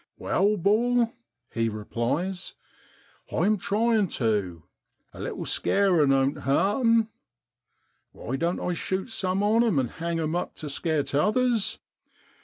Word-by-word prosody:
4 - - -8
Wai, 205 +2 +3
'bor,' 230 +5 +2 0.4
he 115 -1 0
replies, 120 - -3 0.8
'I'm 215 +1 +2
tryin' 215 +1 +1
tu; 100 - -1 0.5
a - - -12
little - - -4
scarin' 180 -8 +2
oan't 135 +1 +2
hart 195 - +1
'em! 230 -1 +4 1.0
Why 125 - -5
doan't 170 +5 -1
I 180 - -1
shute 190 +6 -3
some 190 -2 -1
on 220 +3 +4
'em, 220 -10 +1
and 130 -3 0
hang 170 0 -3
'em 160 +1 -1
up 175 - -3
to 150 - -6
scare 155 0 0
t'others 215 - +1
180 Hz, 135 wpm, -26 LUFS, 140-215 Hz, 1.0 s, em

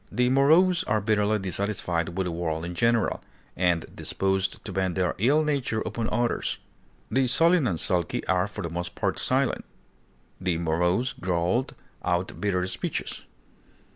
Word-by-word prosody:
The 125 0 +2
morose 165 +7 +4
are 110 0 +1
bitterly 105 0 +2
dissatisfied 90 -3 -2
with 95 - 0
the 90 - -2
world 80 -1 -2
in 90 - -5
general, 115 +5 +1 0.3
and 90 -3 +1
disposed 95 0 -1
to - - -5
vent 95 -2 -1
their 90 -2 +1
ill 140 +9 +4
nature 135 -7 -1
upon 115 0 -3
others. 120 +2 0 0.5
The 130 0 +2
sullen 165 +2 +4
and 85 -7 -1
sulky 90 -3 0
are 90 +1 +1
for 105 0 -7
the 85 - -4
most 85 +1 -4
part - - -1
silent; - - +1 0.8
the 90 -3 0
morose 90 +8 +1
growl 90 +7 0 0.4
out 90 -1 -1
bitter 90 -3 +1
speeches. 95 - -3
95 Hz, 150 wpm, -26 LUFS, 90-120 Hz, 0.8 s, morose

